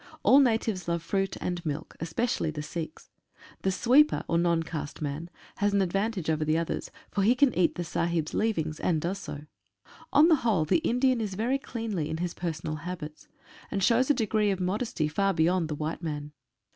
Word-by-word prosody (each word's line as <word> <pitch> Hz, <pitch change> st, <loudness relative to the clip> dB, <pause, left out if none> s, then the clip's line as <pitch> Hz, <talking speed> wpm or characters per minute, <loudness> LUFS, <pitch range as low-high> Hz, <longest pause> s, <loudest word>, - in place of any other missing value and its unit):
All 270 Hz, -, +7 dB
natives 220 Hz, -, +1 dB
love 170 Hz, -1 st, -1 dB
fruit 195 Hz, +2 st, -1 dB
and 175 Hz, -1 st, -3 dB
milk, 155 Hz, 0 st, -4 dB
especially 165 Hz, +2 st, -1 dB
the 150 Hz, -1 st, -5 dB
Sikhs. 160 Hz, +2 st, -7 dB, 0.5 s
The 190 Hz, -, +1 dB
sweeper, 260 Hz, +10 st, +4 dB
or 170 Hz, -, +2 dB
non 170 Hz, -1 st, +2 dB
caste 155 Hz, -3 st, -6 dB
man, 150 Hz, +3 st, -4 dB, 0.3 s
has 205 Hz, 0 st, +1 dB
an 200 Hz, -, +4 dB
advantage 195 Hz, 0 st, -1 dB
over 155 Hz, -1 st, +1 dB
the 155 Hz, +1 st, +2 dB
others, 165 Hz, 0 st, -2 dB, 0.2 s
for 200 Hz, -, 0 dB
he 225 Hz, +6 st, +4 dB
can 265 Hz, -1 st, +4 dB
eat 180 Hz, -1 st, +2 dB
the 175 Hz, -, -3 dB
Sahibs' 170 Hz, -2 st, -1 dB
leavings, 160 Hz, -9 st, 0 dB
and 165 Hz, -3 st, +1 dB
does 180 Hz, +5 st, -2 dB
so. 145 Hz, -6 st, -7 dB, 0.7 s
On 300 Hz, +3 st, +6 dB
the 325 Hz, -3 st, +5 dB
whole 215 Hz, -, +1 dB
the 155 Hz, -, +3 dB
Indian 255 Hz, -4 st, +2 dB
is 205 Hz, -3 st, -3 dB
very 245 Hz, +7 st, 0 dB
cleanly 225 Hz, -, -3 dB
in 160 Hz, -, -2 dB
his 175 Hz, +1 st, -2 dB
personal 155 Hz, -3 st, -4 dB
habits, 155 Hz, -1 st, -7 dB, 0.4 s
and 195 Hz, -, -2 dB
shows 235 Hz, +6 st, +3 dB
a 290 Hz, -, +5 dB
degree 215 Hz, -3 st, +1 dB
of 190 Hz, -2 st, 0 dB
modesty 190 Hz, -2 st, -1 dB
far 195 Hz, +6 st, +1 dB
beyond 170 Hz, +1 st, +2 dB
the 150 Hz, -, -2 dB
white 155 Hz, +3 st, -4 dB
man. 150 Hz, -3 st, -4 dB
180 Hz, 195 wpm, -28 LUFS, 160-220 Hz, 0.7 s, All